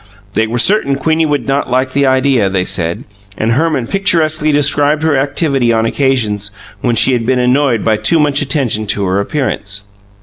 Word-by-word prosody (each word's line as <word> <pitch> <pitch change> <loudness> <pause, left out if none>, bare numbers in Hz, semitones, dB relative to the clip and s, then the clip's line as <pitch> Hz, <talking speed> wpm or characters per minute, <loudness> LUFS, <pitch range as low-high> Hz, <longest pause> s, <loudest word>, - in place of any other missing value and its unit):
They 110 +1 +1
were 120 +2 -3
certain 140 - +2
Queenie 160 +3 0
would 145 -5 -2
not 135 0 -1
like 130 +1 0
the 140 +1 +1
idea, 130 -5 +2
they 95 -1 -1
said, 85 -1 -1 0.3
and 110 +1 0
Herman 145 -1 0
picturesquely 155 -4 0
described 145 +1 +1
her 160 -2 +2
activity 135 -2 0
on 115 -1 +1
occasions 115 -6 -1 0.3
when 120 -2 0
she 130 - +4
had 120 -2 0
been 130 +2 0
annoyed 125 -1 +1
by 110 -1 +1
too 165 +8 +1
much 145 -2 +1
attention 130 -7 -1
to 100 0 -1
her 95 +1 0
appearance. 100 -4 -3
130 Hz, 180 wpm, -13 LUFS, 115-145 Hz, 0.3 s, she